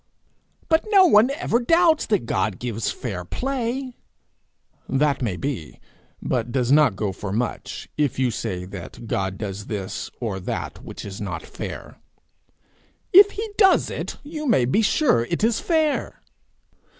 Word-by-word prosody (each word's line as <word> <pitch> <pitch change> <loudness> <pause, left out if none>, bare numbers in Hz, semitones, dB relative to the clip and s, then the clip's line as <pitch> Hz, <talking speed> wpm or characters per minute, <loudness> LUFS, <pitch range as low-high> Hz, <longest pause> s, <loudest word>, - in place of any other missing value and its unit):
'But 320 -1 +3
no 395 -3 +6
one 235 -6 +6
ever 275 -5 0
doubts 330 +5 +3
that 210 - +1
God 95 -3 -1
gives 115 -2 -3
fair 100 -8 -4
play!' 255 - -3 1.0
'That 140 +1 +1
may 110 -7 -1
be 130 - -5 0.4
but 120 - -1
does 125 -1 0
not 145 -7 +5
go 100 0 -2
for 95 +1 -6
much, 115 +4 -3
if 145 -5 +1
you 130 -2 +1
say 95 -5 -4
that 95 +4 -9
God 95 -3 -2
does 100 -1 -5
this 100 -4 -4
or 110 -6 -3
that 90 - -5
which - - -8
is 100 0 -7
not 90 -5 -4
fair.' - - -8 1.2
'If 400 +2 +9
he 435 +2 -3
does 385 -3 +5
it, - - -5
you 300 0 -5
may 190 - +4
be 135 - +2
sure 225 - +3
it 170 - -2
is 225 0 +2
fair.' 315 -3 0
130 Hz, 150 wpm, -23 LUFS, -, 1.2 s, If